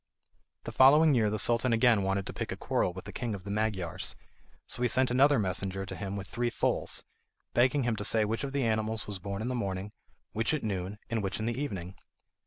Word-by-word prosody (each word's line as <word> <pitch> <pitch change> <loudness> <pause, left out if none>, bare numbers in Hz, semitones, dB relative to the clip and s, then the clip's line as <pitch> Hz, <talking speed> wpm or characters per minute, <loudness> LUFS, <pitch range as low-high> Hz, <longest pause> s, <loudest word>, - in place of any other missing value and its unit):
The - - -6
following 150 +4 +6
year 110 -4 +3
the 110 - -1
Sultan 115 +3 +3
again 115 -2 +4
wanted 95 0 -1
to - - -6
pick - - -4
a - - -4
quarrel - - 0
with 95 +1 -9
the - - -7
king 115 -4 -3
of 95 - -9
the 100 - -6
Magyars, 105 -5 -2 0.5
so - - -2
he 125 - +3
sent 130 +1 +2
another 140 +3 +5
messenger 95 -1 -1
to - - -7
him 100 -1 -5
with 100 -1 -5
three 120 +1 -1
foals, 120 - -1 0.5
begging 130 +3 +3
him 120 -2 0
to 105 - -3
say 110 +1 +3
which 115 +5 -2
of 140 - -3
the 140 -1 0
animals 110 0 -1
was 100 -2 -6
born 100 +3 -4
in - - -3
the 130 - -1
morning, 100 -3 -3 0.4
which 115 +7 0
at 150 - -4
noon, 100 -1 -3
and 115 -1 0
which 95 +1 -3
in 110 - -2
the 120 - 0
evening. 95 -10 -4
110 Hz, 230 wpm, -30 LUFS, 100-120 Hz, 0.5 s, following